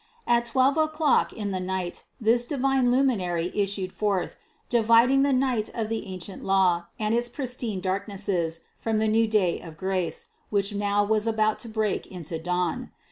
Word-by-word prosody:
At 235 Hz, 0 st, +3 dB
twelve 260 Hz, +4 st, +2 dB
o'clock 310 Hz, -2 st, +2 dB
in 205 Hz, -3 st, -4 dB
the 185 Hz, -, -2 dB
night 185 Hz, -1 st, -4 dB
this 235 Hz, +2 st, +2 dB
divine 270 Hz, -2 st, +2 dB
Luminary 185 Hz, -10 st, +1 dB
issued 195 Hz, -2 st, -1 dB
forth, 200 Hz, -4 st, -1 dB, 0.3 s
dividing 235 Hz, +3 st, +4 dB
the 280 Hz, 0 st, +3 dB
night 255 Hz, -4 st, +1 dB
of 220 Hz, -2 st, -2 dB
the 225 Hz, -2 st, -3 dB
ancient 185 Hz, 0 st, -7 dB
Law 185 Hz, -3 st, +2 dB
and 215 Hz, 0 st, 0 dB
its 240 Hz, +1 st, 0 dB
pristine 245 Hz, -6 st, -4 dB
darknesses 190 Hz, -3 st, -2 dB
from 225 Hz, -1 st, -1 dB
the 220 Hz, 0 st, +2 dB
new 225 Hz, +1 st, +3 dB
day 205 Hz, -6 st, +2 dB
of 160 Hz, -2 st, -11 dB
grace, 190 Hz, -2 st, -2 dB, 0.2 s
which 200 Hz, 0 st, 0 dB
now 205 Hz, 0 st, +1 dB
was 215 Hz, +1 st, +1 dB
about 215 Hz, -1 st, +1 dB
to 235 Hz, -, -6 dB
break 215 Hz, -2 st, -1 dB
into 165 Hz, -3 st, -6 dB
dawn. 180 Hz, 0 st, -1 dB
215 Hz, 165 wpm, -26 LUFS, 185-240 Hz, 0.3 s, dividing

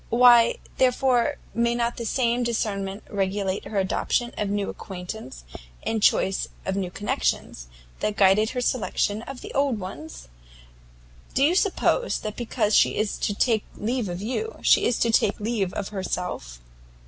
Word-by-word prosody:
Why, 240 Hz, -1 st, +6 dB, 0.2 s
therefore, 255 Hz, +1 st, +3 dB, 0.2 s
may 235 Hz, +2 st, +1 dB
not 235 Hz, 0 st, -1 dB
the 235 Hz, -, -4 dB
same 240 Hz, -1 st, +1 dB
discernment 205 Hz, -4 st, -2 dB
regulate 195 Hz, -1 st, -2 dB
her 210 Hz, -, -4 dB
adoption 220 Hz, +5 st, 0 dB
of 210 Hz, -, -2 dB
new 205 Hz, 0 st, -1 dB
acquaintance, 180 Hz, -, -7 dB, 0.4 s
and 220 Hz, -1 st, -1 dB
choice 190 Hz, -1 st, +2 dB, 0.2 s
of 190 Hz, -, -1 dB
new 190 Hz, -2 st, -2 dB
connections, -, -, -2 dB, 0.3 s
that 210 Hz, -, -1 dB
guided 200 Hz, +3 st, +4 dB
her 250 Hz, -, -3 dB
selection 220 Hz, -3 st, 0 dB
of 265 Hz, +2 st, -9 dB
old 275 Hz, -5 st, +1 dB
ones? 160 Hz, -, -8 dB, 1.1 s
Do 270 Hz, -, +3 dB
you 310 Hz, +5 st, +4 dB
suppose 400 Hz, +6 st, +1 dB
that 210 Hz, -1 st, -5 dB
because 225 Hz, -3 st, 0 dB
she -, -, +4 dB
is 215 Hz, -1 st, -1 dB
to 205 Hz, -, -1 dB
take 220 Hz, -1 st, +2 dB
leave 230 Hz, -1 st, -2 dB
of 175 Hz, +2 st, -5 dB
you, 435 Hz, -, -3 dB
she -, -, +5 dB
is 240 Hz, -, +2 dB
to 230 Hz, -, +2 dB
take 210 Hz, -2 st, +2 dB
leave 210 Hz, -4 st, -1 dB
of 195 Hz, -, -3 dB
herself?" 180 Hz, -, -4 dB
215 Hz, 155 wpm, -25 LUFS, 195-240 Hz, 1.1 s, Why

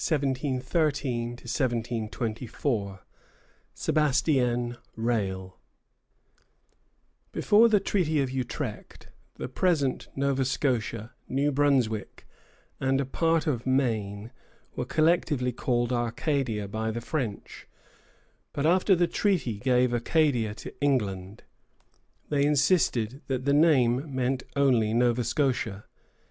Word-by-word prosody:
Reprisal. 160 Hz, -, +2 dB
Attack 140 Hz, -1 st, 0 dB, 0.8 s
on 120 Hz, -1 st, -2 dB, 0.7 s
Norridgewock. 110 Hz, -2 st, -3 dB, 0.9 s
Death 150 Hz, -3 st, +2 dB
of 120 Hz, -4 st, +1 dB, 0.2 s
Rale. 95 Hz, -5 st, -2 dB, 1.7 s
Before 225 Hz, +3 st, +4 dB
the 210 Hz, -2 st, +4 dB
Treaty 175 Hz, -6 st, 0 dB
of 135 Hz, -2 st, 0 dB
Utrecht, 130 Hz, -2 st, -5 dB, 0.3 s
the -, -, -5 dB
present 145 Hz, -1 st, 0 dB
Nova 135 Hz, -1 st, +1 dB
Scotia, 120 Hz, -4 st, -1 dB, 0.2 s
New 140 Hz, +3 st, +1 dB
Brunswick, 130 Hz, -7 st, 0 dB, 0.5 s
and 135 Hz, 0 st, +1 dB
a 140 Hz, -, 0 dB
part 165 Hz, +4 st, +1 dB
of 130 Hz, -6 st, -2 dB
Maine 110 Hz, -5 st, 0 dB, 0.4 s
were -, -, -2 dB
collectively 155 Hz, -5 st, +1 dB
called 120 Hz, 0 st, -1 dB
Acadia 120 Hz, -2 st, -1 dB
by 110 Hz, +2 st, -3 dB
the 115 Hz, +1 st, -3 dB
French; 120 Hz, -6 st, -4 dB, 0.9 s
but 140 Hz, -, -1 dB
after 185 Hz, +3 st, +4 dB
the 175 Hz, 0 st, +3 dB
treaty 170 Hz, -, 0 dB
gave 125 Hz, 0 st, +2 dB
Acadia 120 Hz, -4 st, +1 dB
to -, -, -9 dB
England, 105 Hz, -8 st, -1 dB, 0.9 s
they 145 Hz, -1 st, +2 dB
insisted 140 Hz, -4 st, +2 dB
that 130 Hz, -1 st, -2 dB
the 140 Hz, -, +3 dB
name 140 Hz, -3 st, +3 dB
meant 130 Hz, 0 st, 0 dB
only 120 Hz, -6 st, +3 dB
Nova 120 Hz, 0 st, +2 dB
Scotia. 120 Hz, -5 st, -1 dB
130 Hz, 105 wpm, -27 LUFS, 115-145 Hz, 1.7 s, Before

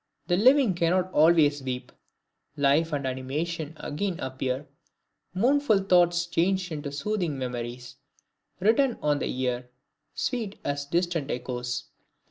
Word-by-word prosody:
The 175 Hz, -, +2 dB
living 255 Hz, +2 st, +5 dB
cannot 175 Hz, +2 st, +1 dB
always 150 Hz, -2 st, +4 dB
weep; 125 Hz, -1 st, -5 dB, 0.7 s
life 145 Hz, +4 st, +3 dB
and 140 Hz, -2 st, -2 dB
animation 150 Hz, +5 st, -3 dB
again 180 Hz, +4 st, -3 dB
appear, 130 Hz, +1 st, -3 dB, 0.7 s
mournful 240 Hz, -1 st, +3 dB
thoughts 175 Hz, -2 st, +4 dB
changed 175 Hz, +1 st, 0 dB
into 145 Hz, -2 st, -4 dB
soothing 170 Hz, 0 st, -2 dB
memories, 125 Hz, -1 st, -5 dB, 0.6 s
return 230 Hz, +6 st, +3 dB
on 145 Hz, -1 st, +2 dB
the -, -, -2 dB
ear, 125 Hz, -1 st, -2 dB, 0.5 s
sweet 225 Hz, -5 st, -2 dB
as 145 Hz, 0 st, -2 dB
distant 170 Hz, -3 st, 0 dB
echoes. 125 Hz, -1 st, -3 dB
160 Hz, 115 wpm, -27 LUFS, 130-185 Hz, 0.7 s, living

